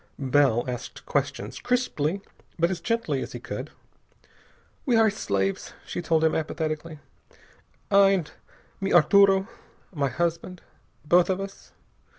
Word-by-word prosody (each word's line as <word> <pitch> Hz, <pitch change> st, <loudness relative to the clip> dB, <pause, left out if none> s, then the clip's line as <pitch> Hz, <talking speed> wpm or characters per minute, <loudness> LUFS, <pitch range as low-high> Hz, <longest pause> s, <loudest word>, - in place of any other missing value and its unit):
Bell 135 Hz, -3 st, +2 dB
asked 125 Hz, -2 st, -6 dB
questions, -, -, -2 dB
crisply, 200 Hz, -, -1 dB, 0.4 s
but 170 Hz, +2 st, +2 dB
as 175 Hz, -3 st, -4 dB
gently 205 Hz, -, -1 dB
as -, -, -6 dB
he -, -, -6 dB
could. -, -, -6 dB, 1.1 s
"We 250 Hz, -5 st, +2 dB
are 225 Hz, 0 st, +5 dB
his 215 Hz, 0 st, 0 dB
slaves," 95 Hz, 0 st, -2 dB
she -, -, -4 dB
told 160 Hz, -1 st, +1 dB
him 160 Hz, -, +3 dB
apathetically. 155 Hz, 0 st, -3 dB, 0.9 s
"I 200 Hz, -1 st, +6 dB
and 185 Hz, -6 st, 0 dB, 0.5 s
mi 195 Hz, 0 st, -2 dB
Arturo 195 Hz, +3 st, +5 dB, 0.5 s
my 140 Hz, -4 st, 0 dB
husband. 170 Hz, +3 st, -3 dB, 0.4 s
Both 175 Hz, +4 st, +4 dB
of 190 Hz, 0 st, 0 dB
us...." 195 Hz, 0 st, -9 dB
170 Hz, 135 wpm, -26 LUFS, 150-195 Hz, 1.1 s, I